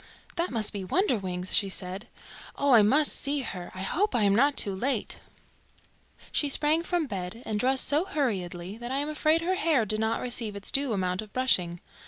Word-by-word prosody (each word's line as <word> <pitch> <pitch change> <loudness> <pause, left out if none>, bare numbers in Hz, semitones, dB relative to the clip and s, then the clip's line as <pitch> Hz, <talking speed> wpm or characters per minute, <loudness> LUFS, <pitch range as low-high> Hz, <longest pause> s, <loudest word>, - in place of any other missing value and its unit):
"That 340 +1 0
must 220 -4 +1
be 200 -2 -4
Wonderwings," 185 - 0
she 200 -3 +2
said. 190 +3 -5 0.5
"Oh, 280 0 +1
I 235 -3 +8
must 280 +9 +3
see 285 0 -1
her. 185 -7 -6
I 185 - -5
hope 395 - 0
I 230 - +2
am 200 -1 +4
not 280 +6 +3
too 200 - +3
late." 235 +3 -1 1.1
She 290 - +1
sprang 300 +3 +3
from 345 -1 -1
bed 200 0 -6
and 210 -1 -2
dressed 260 +3 +1
so 295 +6 +2
hurriedly 195 - -3
that 240 +1 -6
I 270 - 0
am 290 +2 -1
afraid 310 +1 +2
her 360 +3 0
hair 315 -10 +2
did 215 +1 -1
not 220 +1 0
receive 235 -4 -3
its 200 - -5
due 275 -2 +1
amount 185 -1 -1
of 215 -1 -11
brushing. 180 -10 +1
235 Hz, 200 wpm, -27 LUFS, 195-285 Hz, 1.1 s, I